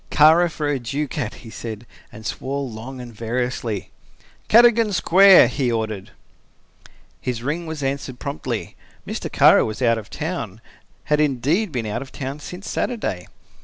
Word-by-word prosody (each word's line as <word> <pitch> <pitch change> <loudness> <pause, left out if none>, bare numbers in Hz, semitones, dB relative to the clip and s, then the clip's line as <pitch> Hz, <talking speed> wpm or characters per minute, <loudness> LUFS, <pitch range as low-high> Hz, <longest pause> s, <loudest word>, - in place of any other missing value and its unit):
"Kara 160 +4 +5
for 155 -2 -3
a 145 -2 0
ducat!" 135 -1 -3
he 110 - -10
said, 115 0 -7 0.3
and 110 +1 -12
swore 140 +5 -3
long 120 +3 -8
and 120 -1 -9
variously. 115 -2 -3 0.6
"Cadogan 230 -2 +5
Square," 190 +1 +7
he 130 -4 -1
ordered. 110 -4 -3 1.1
His 120 -2 -3
ring 160 +5 -2
was 160 -3 -5
answered 135 -2 -3
promptly. 130 -5 -4 0.3
Mr. - - -5
Kara - - +6
was 110 0 -4
out 115 -3 +2
of 105 - -12
town, 150 - -4 0.4
had 150 0 +1
indeed 150 - +1
been 120 -5 -3
out 110 +3 -3
of 135 - -9
town 135 +2 -5
since 180 +6 -9
Saturday. 155 - -3
135 Hz, 150 wpm, -22 LUFS, 115-155 Hz, 1.1 s, Square